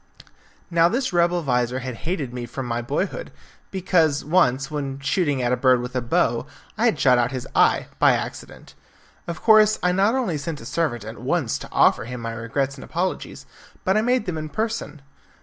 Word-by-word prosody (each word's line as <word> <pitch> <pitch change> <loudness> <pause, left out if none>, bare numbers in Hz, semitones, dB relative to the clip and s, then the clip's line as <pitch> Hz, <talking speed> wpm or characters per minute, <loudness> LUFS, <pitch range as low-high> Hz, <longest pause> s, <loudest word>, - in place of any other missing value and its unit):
Now 170 0 +4
this 250 -1 -1
rebel 175 0 +2
vizir 125 -2 0
had 130 0 -5 0.2
hated 145 -9 -3
me 120 -1 -5
from 130 +2 -5
my 120 0 -2
boy 140 +10 -1
hood, - - -8 0.4
because 170 -6 +1
once, 140 -5 +2
when 140 -2 -4
shooting 140 -1 0
at 120 - +1
a - - +3
bird 130 0 +3
with 125 +1 -6
a 125 - +1
bow, 120 - 0 0.3
I - - +1
had - - +2
shot 125 -2 +5
out 120 +1 +1
his 130 -2 -5
eye - - +4
by - - +6
accident. - - -6 0.5
Of 170 -2 -6
course 215 -1 +6
I 180 - +3
not 195 +6 +2
only 215 - -1
sent 150 +1 -5
a - - -11
servant 130 -5 -2
at 110 +1 -8
once 130 -1 -1
to - - -9
offer - - +3
him 125 +1 -6
my 115 -1 -4
regrets 135 +5 -2
and - - -9
apologies, 180 +3 -4 0.4
but 190 - +2
I 215 - +3
made 245 0 +1
them 165 -4 -3
in 155 0 -6
person. 215 -4 -4
145 Hz, 200 wpm, -23 LUFS, 125-180 Hz, 0.5 s, by